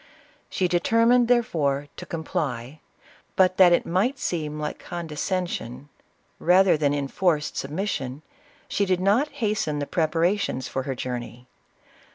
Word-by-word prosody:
She 185 - 0
determined, 230 +7 +3
there 240 -1 +4
fore, 145 -7 -1
to - - -8
comply; 145 -4 -4 0.6
but 185 -1 +3
that 185 -2 +7
it 175 - +3
might 210 +11 0
seem 150 - -3
like 150 0 -4
condescen 175 +2 -3
sion, 125 -1 -7 0.5
rather 185 +2 +5
that 145 -2 +1
enforced 150 +3 0
submission, 145 -3 -3 0.4
she 200 - 0
did 185 -1 +1
not 205 +10 +3
has 220 -7 -1
ten 150 -1 -2
the 145 - -2
preparations 165 -2 0
for 135 - -3
her 135 - -1
journey. 125 -1 -6
170 Hz, 140 wpm, -25 LUFS, 145-190 Hz, 0.6 s, that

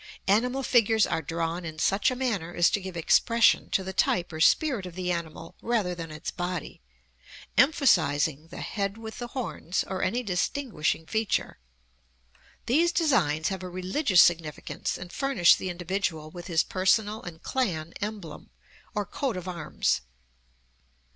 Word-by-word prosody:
Animal 250 +7 +2
figures 225 -4 +4
are 165 -1 -1
drawn 165 +2 -3
in 160 -2 -7
such 195 +6 +2
a 255 - -3
manner 205 -10 -2
as 175 - +4
to 205 - 0
give 185 -2 -7
expression 230 +7 +3
to 190 - +1
the 190 0 -5
type 175 -2 +1
or 155 - -5
spirit 240 - +3
of 175 - -11
the 180 -1 -2
animal 165 -1 -5
rather 220 -7 0
than 165 -2 -7
its 155 0 -6
body, 175 - -5 0.7
emphasizing 160 - +3
the 175 - -9
head 200 -1 -3
with 220 -1 -8
the 240 - -4
horns, 235 - -3
or 190 -1 -4
any 235 +7 0
distinguishing 190 - -1
feature. 220 +3 -1 1.1
These 330 +8 +3
designs 195 - +2
have 190 -2 -4
a 185 - -6
religious 185 - +3
significance 165 -3 -1
and 175 0 -9
furnish 270 -11 +4
the 185 - -3
individual 175 -3 -3
with 175 0 -9
his 165 -2 +2
personal 205 +3 +1
and 160 -2 -10
clan 170 -11 -2
emblem, 205 -8 -6 0.5
or 205 -1 -1
coat 255 +1 -3
of 180 0 -6
arms. 170 -4 -1
185 Hz, 155 wpm, -27 LUFS, 170-225 Hz, 1.1 s, figures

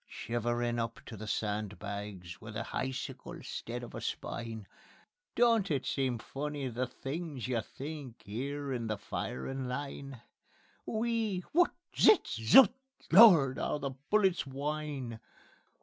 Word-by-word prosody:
Shiverin' 120 +1 -1
up 115 0 -3
to 115 - -8
the 110 +1 -7
sandbags, 100 -4 -4
With 110 -1 -9
a 115 - -2
hicicle 130 0 -4
'stead 120 +1 -5
of 120 - -9
a - - -5
spine, 115 -3 -4 0.7
Don't 230 -4 +4
it 140 -4 0
seem 130 -3 0
funny 140 +3 -4
the 125 +2 -2
things 140 0 -5
you 120 -3 0
think 140 -2 -8
'Ere 140 +6 -3
in 115 -2 -2
the 110 -1 -1
firin' 130 - -4
line: 140 -1 -5 0.7
_(WHEE! 220 -4 0
WHUT! 350 +2 +4 0.2
ZIZ! 425 - +7 0.2
ZUT! 240 - +8 0.4
LORD! 165 - +8
'OW - - 0
THE 140 -2 -3 0.2
BULLETS 190 -7 +3
WHINE!) 140 -3 -3
130 Hz, 130 wpm, -32 LUFS, 115-150 Hz, 0.7 s, ZUT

